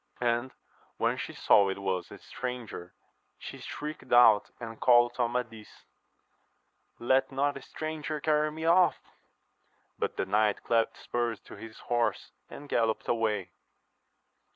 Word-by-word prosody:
And 120 +1 0 0.5
when - - +1
she - - -5
saw 100 -1 +4
it 95 - -3
was 95 -2 -2
a - - -10
stranger, 125 -8 -7 0.4
she - - -9
shrieked 150 +1 -7
out 115 -4 +6
and 115 -2 -8
called 120 -1 +5
to 125 - -3
Amadis, 115 -2 -4 1.1
Let 130 +3 +2
not 140 +2 0
a 140 - -8
stranger 155 -1 -5
carry 150 0 +1
me 160 +1 -6
off! 175 +2 +5 1.0
But - - -2
the - - 0
knight 105 +1 +1
clapt 115 -1 +1
spurs 120 -2 -2
to - - -12
his 110 -1 -11
horse, 120 -1 -1 0.2
and 145 - -10
gallopped 115 -4 0
away. 105 -6 0
120 Hz, 135 wpm, -29 LUFS, 110-140 Hz, 1.1 s, out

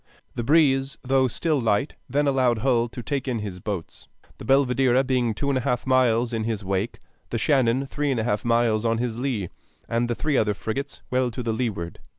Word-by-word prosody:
The 120 - -3
breeze, 135 -1 +3
though 130 0 +3
still 150 +3 0
light, 115 +5 +1 0.2
then 145 +3 +1
allowed 130 -4 +2
Hull 120 -3 +3
to 120 +1 -8
take 140 0 -3
in 125 -3 0
his 100 -4 -5
boats, 95 -3 -6 0.3
the - - -8
Belvidera 130 -1 +3
being 125 -4 0
two 140 - -2
and 135 -2 +1
a - - -3
half 125 0 -1
miles 125 -2 +2
in 110 -1 -1
his 110 -3 -3
wake, 95 +3 -2 0.3
the 115 - -2
Shannon 130 0 +2
three 145 +2 -2
and 130 -4 0
a - - 0
half 105 -3 -1
miles 115 -2 +2
on 115 -1 +1
his 120 -1 -2
lee, 120 -9 -2 0.4
and 120 +1 0
the 120 - 0
three 150 0 0
other 105 -1 +2
frigates 135 +8 -5
well 125 0 +2
to 120 +1 -5
leeward. 110 -7 -3
120 Hz, 205 wpm, -24 LUFS, 115-135 Hz, 0.4 s, breeze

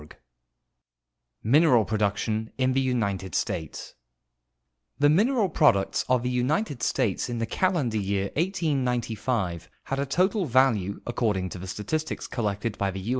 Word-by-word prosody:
418. 110 - -2
MINERAL 140 -7 +5
PRODUCTION 110 +1 -1
IN 130 0 +1
THE 135 - +2
UNITED 100 -8 -1
STATES 80 -2 -3 1.0
The 145 0 +4
mineral 220 - +3
products 140 - +2
of 125 -2 +2
the 125 - -1
United 130 - -1
States 115 -2 0
in 120 - -3
the 115 - -1
calendar 145 -5 0
year 100 0 -1
1895 125 - -1
had 135 - -3
a 140 - -1
total 185 +7 +1
value, 115 -7 +2
according 105 -6 -1
to 90 - -8
the 95 - -7
statistics 155 - -3
collected 105 -2 -3
by 100 - +1
the 95 0 -5
U. 95 +4 -6
120 Hz, 140 wpm, -26 LUFS, 100-140 Hz, 1.0 s, MINERAL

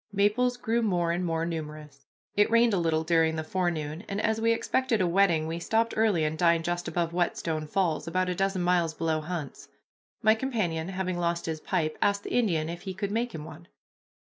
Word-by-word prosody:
Maples 210 +5 +2
grew 235 -1 0
more 175 -6 +1
and 175 +2 -1
more 165 -1 -1
numerous. 150 -4 -7 0.3
It 205 0 +4
rained 230 -1 +4
a 190 - +2
little 160 -1 +1
during 160 -1 +2
the 160 - -2
forenoon, 160 -1 -2
and, 200 0 -2
as 220 +1 0
we 230 0 +3
expected 235 0 +1
a 185 - +2
wetting, 170 -3 +3
we 165 +1 -3
stopped 225 +6 +1
early 215 -7 +2
and 155 +1 -2
dined 170 -1 +3
just 175 +1 -2
above 170 -1 -1
Whetstone 165 -3 -1
Falls, 170 -2 0
about 185 +2 0
a 180 - 0
dozen 195 0 0
miles 175 -3 +1
below 160 -1 0
Hunt's. 155 -3 -6 0.6
My 220 - +6
companion, 215 -10 -2
having 185 -2 -2
lost 170 0 -1
his 160 -1 -3
pipe, 160 -3 -2
asked 200 0 +2
the - - -5
Indian 175 -10 +1
if 170 +1 -6
he 190 -1 -6
could 200 +1 -3
make 235 0 -1
him 150 -1 -6
one. 160 +2 -11
175 Hz, 205 wpm, -28 LUFS, 160-200 Hz, 0.6 s, My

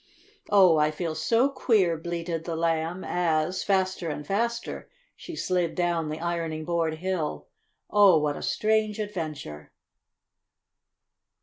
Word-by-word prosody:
"Oh, 185 -5 +6
I 150 0 +3
feel 160 +1 -3
so 230 - +2
queer!" 220 -10 +2
bleated 165 0 -4
the 170 - -3
Lamb 165 +2 -1
as, 170 0 0
faster 185 -3 0
and 150 -1 -5
faster, 235 +6 -2 0.3
she 340 - -9
slid 180 - -1
down 170 -3 0
the 155 +1 -4
ironing 165 -2 -3
board 165 -2 0
hill. 175 -2 -3 0.4
"Oh, 200 -5 +6
what 150 -1 0
a - - -7
strange 215 -1 +1
adventure!" 155 - -5
170 Hz, 125 wpm, -26 LUFS, 160-195 Hz, 0.4 s, Oh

